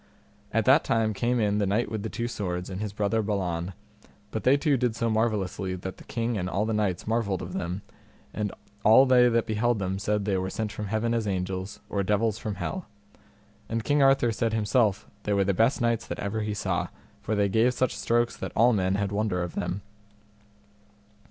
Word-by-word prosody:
At -, -, +1 dB
that -, -, +6 dB
time 110 Hz, -1 st, +1 dB
came 120 Hz, +5 st, 0 dB
in 105 Hz, -1 st, +1 dB
the 100 Hz, -, +1 dB
Knight 105 Hz, +3 st, 0 dB
with 110 Hz, -2 st, -2 dB
the 110 Hz, -, -4 dB
Two 120 Hz, +2 st, -3 dB
Swords 90 Hz, -6 st, -4 dB
and 95 Hz, +2 st, -5 dB
his 105 Hz, -2 st, -3 dB
brother 105 Hz, +2 st, 0 dB
Balan, 95 Hz, -4 st, -2 dB, 0.6 s
but 110 Hz, -, -3 dB
they 135 Hz, +2 st, +5 dB
two 145 Hz, -1 st, +2 dB
did 125 Hz, -3 st, 0 dB
so 115 Hz, -1 st, 0 dB
marvellously 105 Hz, -4 st, 0 dB
that 95 Hz, +1 st, -6 dB
the -, -, -13 dB
king 115 Hz, -1 st, -2 dB
and 90 Hz, +1 st, -2 dB
all 100 Hz, +3 st, 0 dB
the 110 Hz, -, -1 dB
knights 105 Hz, -5 st, 0 dB
marvelled 110 Hz, -5 st, 0 dB
of 90 Hz, -, -7 dB
them, 90 Hz, +3 st, -3 dB, 0.5 s
and 105 Hz, -2 st, -2 dB, 0.3 s
all 115 Hz, +5 st, +7 dB
they 125 Hz, -2 st, +6 dB
that 115 Hz, -1 st, +2 dB
beheld 115 Hz, +1 st, +1 dB
them 95 Hz, -1 st, -2 dB
said 105 Hz, 0 st, 0 dB
they 100 Hz, -2 st, +1 dB
were 95 Hz, 0 st, -2 dB
sent 105 Hz, +2 st, -3 dB
from 105 Hz, 0 st, -5 dB
heaven 110 Hz, +3 st, 0 dB
as 115 Hz, -2 st, 0 dB
angels, 95 Hz, +1 st, -3 dB
or 100 Hz, -, -1 dB
devils 105 Hz, +2 st, +1 dB
from 110 Hz, -4 st, -4 dB
hell; 180 Hz, -, -4 dB, 0.8 s
and 115 Hz, 0 st, -1 dB
King 145 Hz, +3 st, +2 dB
Arthur 135 Hz, -3 st, +4 dB
said 115 Hz, +1 st, -1 dB
himself 110 Hz, -1 st, +1 dB
they 105 Hz, -, -1 dB
were 100 Hz, -1 st, +3 dB
the 100 Hz, +1 st, +1 dB
best 115 Hz, +9 st, +2 dB
knights 115 Hz, -1 st, +1 dB
that -, -, -4 dB
ever 100 Hz, +2 st, -2 dB
he 105 Hz, -1 st, -2 dB
saw, 105 Hz, -, -1 dB, 0.3 s
for 110 Hz, -, -1 dB
they 100 Hz, -1 st, +2 dB
gave 110 Hz, +5 st, +3 dB
such 125 Hz, 0 st, 0 dB
strokes 120 Hz, 0 st, +1 dB
that -, -, -5 dB
all 120 Hz, +2 st, +5 dB
men 95 Hz, -2 st, +1 dB
had 100 Hz, -1 st, -1 dB
wonder 100 Hz, -4 st, 0 dB
of 85 Hz, -, -5 dB
them. 95 Hz, +3 st, -3 dB
105 Hz, 210 wpm, -27 LUFS, 100-115 Hz, 0.8 s, all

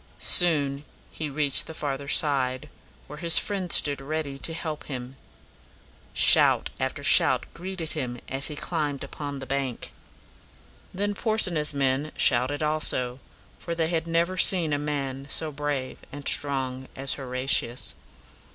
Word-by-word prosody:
Soon 145 Hz, -5 st, +3 dB, 0.3 s
he 155 Hz, -2 st, -5 dB
reached 145 Hz, -1 st, +3 dB
the 160 Hz, -, -9 dB
farther 140 Hz, -2 st, -4 dB
side, 140 Hz, -1 st, +2 dB, 0.4 s
where 150 Hz, +1 st, -11 dB
his 170 Hz, 0 st, +5 dB
friends 190 Hz, -4 st, +2 dB
stood 145 Hz, -2 st, +2 dB
ready 145 Hz, 0 st, -4 dB
to 140 Hz, -, -1 dB
help 160 Hz, -2 st, -6 dB
him. 130 Hz, -1 st, -7 dB, 1.0 s
Shout -, -, +5 dB
after -, -, -3 dB
shout -, -, +5 dB
greeted 175 Hz, -2 st, -6 dB
him 125 Hz, -5 st, -5 dB
as 135 Hz, +1 st, -3 dB
he 150 Hz, -, -6 dB
climbed 145 Hz, -3 st, -3 dB
upon 145 Hz, -1 st, -7 dB
the 135 Hz, -, -8 dB
bank. 135 Hz, -2 st, -4 dB, 1.0 s
Then 205 Hz, +2 st, -2 dB
Porsena's 185 Hz, -10 st, -1 dB
men 140 Hz, +2 st, 0 dB
shouted 130 Hz, +4 st, +3 dB
also, 135 Hz, -5 st, -1 dB, 0.4 s
for 170 Hz, -, -5 dB
they 165 Hz, -1 st, -1 dB
had 165 Hz, -1 st, -2 dB
never 170 Hz, +2 st, 0 dB
seen 175 Hz, -5 st, +4 dB
a 145 Hz, -, 0 dB
man 140 Hz, -2 st, -4 dB
so 160 Hz, -1 st, 0 dB
brave 145 Hz, -2 st, -4 dB
and 145 Hz, 0 st, -8 dB
strong 130 Hz, -2 st, +1 dB
as 135 Hz, 0 st, 0 dB
Horatius. 130 Hz, -2 st, -1 dB
145 Hz, 140 wpm, -25 LUFS, 135-160 Hz, 1.0 s, his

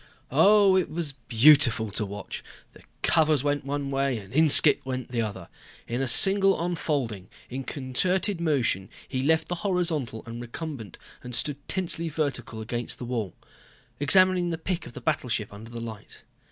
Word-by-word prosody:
Oh, 200 Hz, -2 st, +5 dB
it 185 Hz, -2 st, 0 dB
was 155 Hz, -2 st, -4 dB
beautiful 120 Hz, -2 st, +3 dB
to 105 Hz, +1 st, -2 dB
watch. 100 Hz, 0 st, -8 dB, 0.3 s
The -, -, -17 dB, 0.2 s
covers 155 Hz, -4 st, +2 dB
went 145 Hz, -1 st, -1 dB
one 140 Hz, 0 st, -4 dB
way 135 Hz, -2 st, -1 dB
and 100 Hz, 0 st, -11 dB
Inskipp 155 Hz, 0 st, +7 dB
went 130 Hz, -2 st, -6 dB
the 120 Hz, -2 st, -1 dB
other. 100 Hz, -5 st, -6 dB, 0.4 s
In 120 Hz, +3 st, -3 dB
a 135 Hz, -, -1 dB
single 195 Hz, +9 st, +6 dB
unfolding, 145 Hz, -, -3 dB, 0.2 s
in 135 Hz, +2 st, -5 dB
concerted 170 Hz, +9 st, -1 dB
motion 125 Hz, -, 0 dB, 0.2 s
he 130 Hz, -1 st, -3 dB
left 160 Hz, +3 st, +1 dB
the -, -, -3 dB
horizontal 165 Hz, -, -2 dB
and 115 Hz, +1 st, -8 dB
recumbent 120 Hz, -, -8 dB, 0.2 s
and 125 Hz, -1 st, -5 dB
stood 140 Hz, +3 st, -4 dB
tensely 170 Hz, -3 st, -2 dB
vertical 135 Hz, -7 st, -4 dB
against 120 Hz, +2 st, -5 dB
the 125 Hz, -, -7 dB
wall. 115 Hz, -7 st, -4 dB, 0.6 s
Examining 185 Hz, +4 st, +4 dB
the 165 Hz, -, -3 dB
pic 175 Hz, +1 st, -4 dB
of -, -, -12 dB
the -, -, -10 dB
battleship 125 Hz, -9 st, -2 dB
under 110 Hz, +3 st, -11 dB
the 120 Hz, 0 st, -8 dB
light. 115 Hz, -3 st, -10 dB
135 Hz, 165 wpm, -25 LUFS, 115-165 Hz, 0.6 s, Inskipp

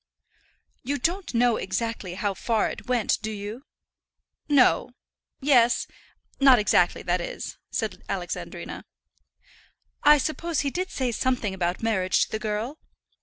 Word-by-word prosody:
"You 280 Hz, +3 st, -2 dB
don't 350 Hz, +8 st, -1 dB
know 240 Hz, -1 st, +3 dB
exactly 205 Hz, -3 st, -3 dB
how 200 Hz, +1 st, -1 dB
far 220 Hz, +3 st, 0 dB
it -, -, -10 dB
went, 245 Hz, -3 st, +1 dB
do 220 Hz, -, -3 dB
you?" 215 Hz, +5 st, -6 dB, 0.8 s
"No; 255 Hz, -3 st, +4 dB, 0.5 s
yes; 245 Hz, -4 st, +4 dB, 0.5 s
not 270 Hz, -2 st, +7 dB
exactly, 210 Hz, -, +2 dB
that -, -, 0 dB
is," -, -, -6 dB
said -, -, -3 dB
Alexandrina. -, -, -5 dB, 1.2 s
"I 295 Hz, 0 st, +7 dB
suppose 320 Hz, +3 st, -1 dB
he 280 Hz, -1 st, -1 dB
did 370 Hz, +4 st, -2 dB
say 255 Hz, -7 st, -1 dB
something 240 Hz, -4 st, 0 dB
about 180 Hz, +1 st, -2 dB
marriage 190 Hz, -5 st, +2 dB
to -, -, -6 dB
the 220 Hz, -, -2 dB
girl?" 220 Hz, +7 st, -3 dB
240 Hz, 130 wpm, -26 LUFS, 215-280 Hz, 1.2 s, not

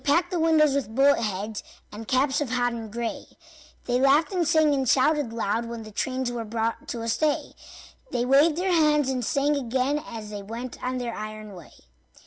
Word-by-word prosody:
They 285 Hz, -, +1 dB
packed 355 Hz, +2 st, +1 dB
the 355 Hz, -, -1 dB
windows 315 Hz, -3 st, +4 dB
with 255 Hz, -6 st, -2 dB
bullet 280 Hz, +2 st, +5 dB
heads 210 Hz, 0 st, -3 dB, 0.3 s
And 215 Hz, +1 st, -9 dB
caps 265 Hz, +2 st, +1 dB
of 285 Hz, -, -2 dB
hodden 245 Hz, -2 st, -1 dB
gray; 235 Hz, +2 st, -4 dB, 0.6 s
They 245 Hz, +1 st, 0 dB
laughed 280 Hz, +6 st, +4 dB
and 350 Hz, -4 st, +1 dB
sang 315 Hz, -2 st, +4 dB
and 265 Hz, -3 st, 0 dB
shouted 290 Hz, -2 st, +2 dB
loud 230 Hz, 0 st, -1 dB
When 230 Hz, -1 st, -6 dB
the 215 Hz, -, -11 dB
trains 255 Hz, +3 st, -2 dB
were 235 Hz, -1 st, -4 dB
brought 225 Hz, +1 st, -3 dB
to 230 Hz, -1 st, -4 dB
a -, -, -4 dB
stay; 300 Hz, +5 st, 0 dB, 0.6 s
They 240 Hz, -, -1 dB
waved 285 Hz, +5 st, +4 dB
their 370 Hz, +1 st, 0 dB
hands 300 Hz, -4 st, +3 dB
and 255 Hz, -2 st, -1 dB
sang 285 Hz, +5 st, +1 dB
again 265 Hz, +2 st, -1 dB
As 220 Hz, -7 st, -8 dB
they 205 Hz, -1 st, -6 dB
went 230 Hz, +5 st, -7 dB
on 255 Hz, 0 st, -2 dB
their 240 Hz, -2 st, -3 dB
iron 215 Hz, -1 st, -7 dB
way. 175 Hz, -4 st, -13 dB
255 Hz, 200 wpm, -25 LUFS, 225-290 Hz, 0.6 s, bullet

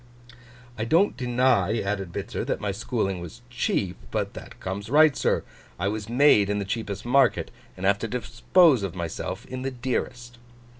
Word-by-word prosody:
'I 110 Hz, -, -1 dB
don't 170 Hz, -, +3 dB
deny,' 120 Hz, -4 st, +2 dB
added 95 Hz, -3 st, -3 dB
Bitzer, -, -, -4 dB
'that -, -, -2 dB
my 100 Hz, -1 st, -2 dB
schooling 100 Hz, -2 st, -2 dB
was 100 Hz, +8 st, -10 dB
cheap. 100 Hz, -6 st, -1 dB
But -, -, -2 dB
that -, -, -11 dB
comes 100 Hz, +3 st, -5 dB
right, 150 Hz, +1 st, +6 dB
sir. -, -, +1 dB, 0.3 s
I 95 Hz, +3 st, 0 dB
was 110 Hz, +1 st, -4 dB
made 120 Hz, -5 st, +5 dB
in 105 Hz, -, 0 dB
the 100 Hz, -, -2 dB
cheapest 100 Hz, -1 st, -4 dB
market, 135 Hz, +3 st, +3 dB, 0.3 s
and 95 Hz, -, -4 dB
have 100 Hz, +1 st, +3 dB
to 115 Hz, -, -3 dB
dispose 125 Hz, -, +3 dB
of 95 Hz, -2 st, -4 dB
myself 85 Hz, -2 st, -5 dB
in 130 Hz, 0 st, -6 dB
the 135 Hz, -, -2 dB
dearest. 120 Hz, -1 st, -4 dB
115 Hz, 170 wpm, -25 LUFS, 100-125 Hz, 0.3 s, right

